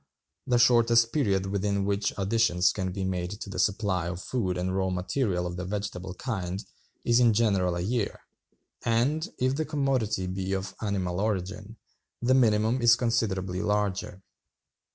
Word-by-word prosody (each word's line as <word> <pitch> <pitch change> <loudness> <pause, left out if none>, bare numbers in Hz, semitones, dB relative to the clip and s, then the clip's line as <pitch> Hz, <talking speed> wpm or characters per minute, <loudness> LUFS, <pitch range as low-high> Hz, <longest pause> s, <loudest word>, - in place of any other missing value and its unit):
The 125 - +3
shortest 115 -1 +4
period 100 -10 +1
within 100 0 -1
which 100 0 0
additions 100 -3 +2
can 95 -2 -2
be 95 +1 -4
made 95 +2 -3
to 100 - -7
the - - -5
supply 95 -4 +1
of 85 0 -4
food 95 -4 -2
and 90 +1 -1
raw 95 -1 +1
material 90 +1 -1
of 90 0 -4
the 90 - -4
vegetable 95 -2 -4
kind 95 -5 -4 0.4
is 120 0 +4
in 120 -3 +5
general 100 -5 +2
a 85 - -2
year, 110 +3 -2 0.6
and, 140 - +1
if 130 +1 +1
the 155 - 0
commodity 135 -10 0
be 95 +1 -3
of 95 +1 -3
animal 95 -4 -1
origin, 105 +1 -3 0.4
the 125 +2 +2
minimum 115 -1 +3
is 120 0 +7
considerably 100 -7 -1
larger. 100 -2 -1
100 Hz, 155 wpm, -27 LUFS, 95-115 Hz, 0.6 s, is